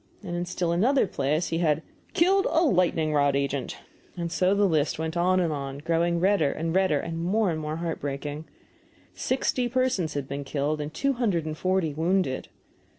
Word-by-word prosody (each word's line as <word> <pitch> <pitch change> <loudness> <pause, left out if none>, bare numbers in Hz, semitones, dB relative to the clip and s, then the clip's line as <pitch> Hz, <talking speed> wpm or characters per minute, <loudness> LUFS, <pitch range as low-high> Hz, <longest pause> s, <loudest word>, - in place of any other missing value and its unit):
And 175 -3 -4
in 175 0 -2
still 175 -1 -1
another 240 +11 +3
place 150 0 -1
he 165 - -1
had 155 -2 +1 0.3
"killed 385 +2 +4
a 325 - +3
lightning 170 - +2
rod 145 -1 +3
agent." 140 -1 -2 0.4
And 170 -1 -3
so 185 +3 +2
the 205 0 +3
list 155 -5 +1
went 160 +1 -3
on, 170 -6 0
growing 170 +3 0
redder 185 -5 +3
and 165 +1 -3
redder, 185 -6 +3
and 165 +1 -4
more 200 +2 +2
and 160 - -3
more 155 0 -3
heartbreaking. 150 -2 -4 0.7
Sixty 255 -1 0
persons 250 - 0
had 140 -2 -3
been 140 +1 -4
killed, 145 +2 -1
and 150 +1 -5
two 275 - 0
hundred 205 -10 0
and 155 -1 -3
forty 185 -2 0
wounded. 165 -2 0
165 Hz, 175 wpm, -26 LUFS, 150-185 Hz, 0.7 s, killed